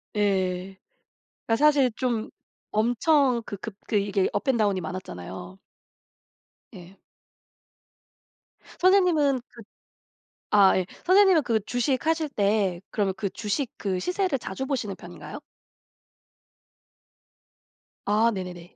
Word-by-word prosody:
예. 190 -2 0 0.7
그러니까 225 - +3
사실 285 -4 +4
좀 235 -4 -1 0.4
엄청 245 +3 +2
그 205 - -5
급 210 +1 -8
그 215 - 0
이게 200 -1 +1
업 205 - -2
앤 260 - +3
다운이 205 -4 +1
많았잖아요. 95 - -7 1.2
예. 185 +2 -13 1.8
선생님은 350 -8 +4
그 235 - -14 0.9
아 200 -2 +6
예 185 - -1 0.2
선생님은 375 -3 +5
그 230 -4 +1
주식 255 +4 -1
하실 320 -1 +1
때 200 -7 0
그러면 200 -3 0
그 200 - -2
주식 225 +6 -3
그 190 -3 -2
시세를 360 - -1
자주 240 +3 -5
보시는 235 -8 -2
편인가요? - - -10 2.7
아 215 +3 +3
네네네. 180 -2 -7
215 Hz, 210 characters per minute, -25 LUFS, 190-270 Hz, 2.7 s, 아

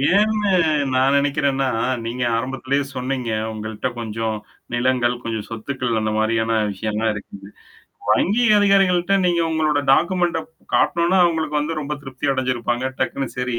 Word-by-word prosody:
ஏன்னு 210 -1 +2 0.4
நான் 130 +2 +3
நெனைக்கிறேன்னா, 140 -1 +1 0.4
நீங்க 125 +2 -3
ஆரம்பத்திலேயே 135 +3 -1
சொன்னீங்க. 125 -2 -3 0.2
உங்கள்ட்ட 110 +3 -4
கொஞ்சம் 110 -1 -3 0.4
நிலங்கள், 125 0 +1
கொஞ்சம் 110 -2 -3
சொத்துக்கள் 120 0 -2
அந்த 110 0 -1
மாரியான 110 +1 +1 0.2
விஷயம்லாம் 110 +2 -1
இருக்குது. 100 -1 -10 0.6
வங்கி 225 +6 +3
அதிகாரிகள்ட்ட 195 -2 +3
நீங்க 170 -1 +2
உங்களோட 155 -2 +1
டாக்குமெண்ட 175 +2 +2 0.4
காட்டனோனா, 170 +2 +3
அவங்களுக்கு 160 -3 0
வந்து 155 +2 -2
ரொம்ப 150 0 -3
திருப்தி 135 +1 -3
அடைஞ்சிருப்பாங்க. 125 -1 -1 0.2
டக்குனு 135 -1 -1
சரி 125 -2 -1
130 Hz, 125 wpm, -21 LUFS, 115-160 Hz, 0.6 s, நான்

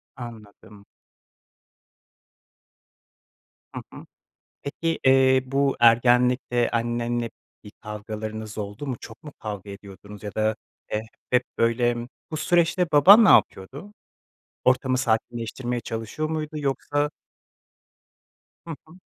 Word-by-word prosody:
Anladım. 105 -4 -12 2.9
Hı - - -4
hı. - - -11 0.6
Peki, 165 +3 -3
eee, 130 0 +5
bu, 135 +1 0
ergenlikte 120 +1 +3
annenle 120 0 -1 0.3
bir 105 - -12
kavgalarınız 110 0 -7
oldu 105 +7 -6
mu, 130 -3 -3
çok 110 0 -12
mu 150 -2 -10
kavga 105 -2 -7
ediyordunuz 100 +1 -12
ya 105 - -7
da, 110 0 0 0.4
eee, 105 +1 -1 0.3
hep 125 0 +3 0.2
böyle, 120 +1 +2 0.3
bu 155 - -4
süreçte 175 +2 +2
baban 200 +10 +8
ne - - +5
yapıyordu? 140 - +2 0.7
Ortamı 130 0 +2
sakinleştirmeye 120 0 -2
çalışıyor 115 +8 -4
muydu? 155 -1 -3
Yoksa 145 +1 -1 1.6
Hı 160 - -5
hı. 175 +4 -17
120 Hz, 105 wpm, -24 LUFS, 110-140 Hz, 2.9 s, baban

